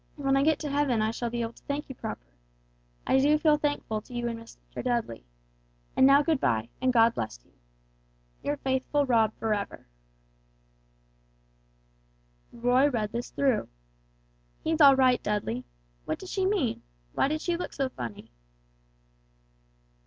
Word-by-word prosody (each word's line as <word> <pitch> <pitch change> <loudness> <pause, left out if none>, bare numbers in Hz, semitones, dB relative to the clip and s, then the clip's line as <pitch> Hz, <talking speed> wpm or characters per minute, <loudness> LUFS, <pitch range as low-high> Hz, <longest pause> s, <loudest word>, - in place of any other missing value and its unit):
When 275 -2 +1
I 275 - +3
get 310 +1 +3
to 300 - -3
heaven 280 -5 +1
I 215 +1 +1
shall 235 +1 -3
be 235 0 -2
able 230 0 -4
to - - -20
thank 285 +1 -3
you 265 - -7
proper. 220 -3 -7 0.8
I 265 - +3
do 295 +3 +4
feel 300 -1 +3
thankful 290 -7 -2
to 245 - -12
you 240 0 -1
and 230 -1 -4
Master 230 - -10
Dudley. 235 - -2 0.7
And 265 - +6
now 280 +1 +6
good 315 -2 +1
bye 115 - 0
and 255 0 +3
God 230 -1 +5
bless 110 - -4
you. - - -29 0.9
"Your 290 0 -2
faithful 270 +2 0
ROB 225 -4 +3
forever." 210 -3 -3 2.7
Roy 245 +4 +3
read 215 -6 -2
this 235 +1 -4
through. 265 -6 +1 1.0
"He's 320 0 0
all 280 -2 +9
right, 255 -2 +4
Dudley. 200 - -2 0.4
What - - -2
did 380 - -10
she 380 0 0
mean? 370 - 0 0.3
Why - - +2
did 310 +2 -1
she 345 0 0
look 350 - -5
so 275 -1 -1
funny?" 120 - -8
255 Hz, 155 wpm, -28 LUFS, 225-290 Hz, 2.7 s, all